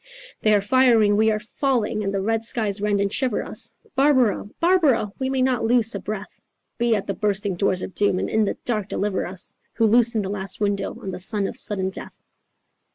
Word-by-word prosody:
'" - - -18
They 215 -1 +4
are 205 - +3
firing, 225 -2 +4
we 220 +1 +3
are 215 -1 0
falling, 220 -1 -1
and 195 - -1
the 195 -1 -1
red 225 +1 0
skies 215 -3 -2
rend 205 -1 +1
and 200 0 0
shiver 255 -5 0
us, - - -2 0.2
Barbara, 260 -7 +2
Barbara, 325 - +3
we 260 0 -1
may 265 -1 +1
not 255 -3 +1
loose 230 0 +3
a 200 - -3
breath— 210 0 -7 0.4
Be 235 -1 +3
at 200 - -2
the 200 - -2
bursting 200 -1 -1
doors 185 0 0
of - - -6
doom, 205 -3 +2
and - - -1
in 220 -1 +1
the - - -3
dark 215 -5 -1
deliver 200 -3 -1
us, 185 0 -5 0.2
Who 225 - +2
loosen 230 -1 +4
the 190 - -4
last 195 -1 -5
window 200 -1 -1
on 190 - -5
the 180 - -6
sun 200 +2 0
of - - -4
sudden 190 -2 -1
death. - - -8
215 Hz, 220 wpm, -23 LUFS, 200-235 Hz, 0.4 s, They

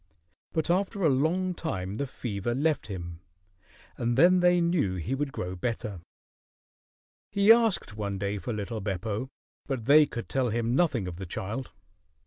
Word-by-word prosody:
But 160 +1 0
after 195 +2 0
a 160 - +5
long 165 +7 +1
time 95 - -4
the 140 +6 -3
fever 120 -2 -3
left 150 0 0
him, 85 -4 -6 0.8
and 120 0 0
then 180 +5 +6
they 180 0 +4
knew 170 - +1
he 90 +8 -3
would 140 +1 -1
grow 90 -6 -4
better. 105 -2 -3 1.3
He 200 +2 +5
asked 225 - +1
one 100 -2 -3
day 100 +1 -2
for 120 - -4
little 105 +1 -4
Beppo, 105 +4 -3 0.4
but 130 -6 -3
they 150 +3 +7
could 120 -3 -6
tell 130 -2 0
him 115 +1 0
nothing 135 - +2
of 85 -2 -6
the 95 -1 -6
child. 110 +9 -5
120 Hz, 160 wpm, -28 LUFS, 100-160 Hz, 1.3 s, they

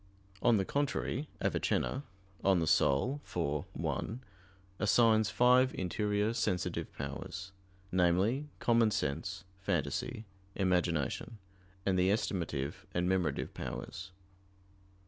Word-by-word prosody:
On 120 -2 +5
the 95 - +1
contrary, 145 +1 -1
Avicenna 135 - 0 0.4
(De - - +2
Anima 90 -3 +4
iv, 75 - +1
1) 115 +4 -3 0.6
assigns 110 0 +4
five 125 +2 +4
interior 105 +3 0
sensitive 90 -5 -1
powers; 90 +7 -6 0.4
namely, 95 +10 +2
"common 115 -2 +4
sense, 95 +1 -2 0.2
phantasy, 95 - -2 0.3
imagination, 90 - 0 0.5
and 95 -2 +2
the 90 +1 +4
estimative 85 -9 -1
and 90 0 +1
memorative 90 -6 0
powers." 95 +2 -6
95 Hz, 95 wpm, -33 LUFS, 85-115 Hz, 0.6 s, On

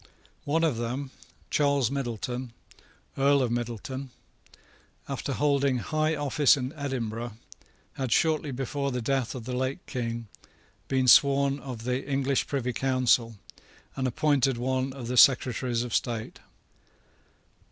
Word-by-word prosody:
One 160 +3 +1
of 155 -8 +1
them, 125 +4 -3 0.4
Charles 140 -4 +2
Middleton, 125 -2 -4 0.7
Earl 140 0 +4
of 120 - -1
Middleton, 120 +3 -4 1.0
after - - -4
holding 140 -3 +2
high 155 +5 0
office 145 0 +3
at 130 0 -3
Edinburgh, 120 -5 -4 0.6
had, 130 -3 -4
shortly 155 +2 +2
before 135 +2 -2
the 125 - -2
death 130 +1 -1
of 125 - -6
the 125 0 -3
late 130 +2 -2
King, 115 -3 -4 0.6
been 130 -1 +1
sworn 140 +2 +5
of 125 -5 -7
the 125 +2 -1
English 135 -1 0
Privy 125 -3 -2
Council, 125 -3 +2 0.6
and 130 -1 -1
appointed 135 0 +2
one 130 +2 -1
of 130 -3 -7
the 125 +1 -2
Secretaries 125 -2 +4
of 120 -2 -6
State. 115 -3 -2
130 Hz, 130 wpm, -27 LUFS, 120-140 Hz, 1.0 s, sworn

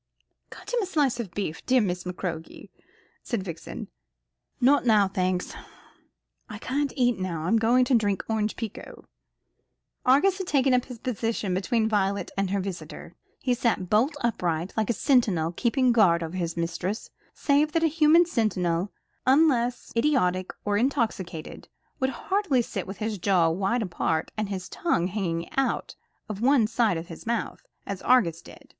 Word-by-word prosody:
"Cut - - -10
him 485 - +2
a 390 - -2
slice 285 -8 +1
of 225 -5 -4
beef, 190 -6 -3
dear 255 0 +5
Miss 180 -5 -1
McCroke," 180 -2 -6 0.5
said 230 -7 -3
Vixen. 170 -3 -7 0.7
"Not 275 +4 +4
now, 215 -5 +4
thanks; 185 -1 -1 1.0
I 210 - -6
can't 275 +5 -1
eat 245 -6 +2
now. 175 -4 -3
I'm 185 +7 +2
going 240 +3 +4
to 255 - 0
drink 205 -5 +2
orange 215 -1 -1
pekoe." 225 -4 -8 1.0
Argus 355 +10 +4
had 380 - -4
taken 270 -4 +3
up 250 0 +2
his 250 -3 -9
position 225 -4 -2
between 220 +4 +1
Violet 200 -2 0
and 195 -1 0
her 200 +1 0
visitor. 175 -3 -7 0.3
He 250 - +2
sat 230 -7 -1
bolt 250 +8 +3
upright, 180 -7 -1
like 220 -2 0
a - - +3
sentinel 205 - +2
keeping 250 +6 +2
guard 180 -8 +4
over 165 +2 -6
his 170 -2 -3
mistress; 170 +5 -3 0.2
save 295 +1 +2
that 330 - +2
a - - +5
human 320 +2 +5
sentinel, 195 - 0 0.4
unless 255 -4 +2
idiotic 185 -9 +1
or 205 -1 +1
intoxicated, 195 - -2 0.3
would 265 - +1
hardly 300 -2 0
sit 195 -5 -5
with 195 - -7 0.2
jaws 170 -4 +3
wide 200 +6 0
apart, 160 -3 -1
and 215 -2 -2
his 190 -2 -4
tongue 180 - 0
hanging 175 -4 -2
out 270 - -1 0.3
of 210 -2 -6
one 260 -2 +4
side 225 -4 +1
of 165 +1 -6
his 165 +6 -10
mouth, 235 -1 -2 0.2
as 200 -2 -5
Argus 175 -10 +3
did. - - -15
215 Hz, 160 wpm, -26 LUFS, 185-255 Hz, 1.0 s, dear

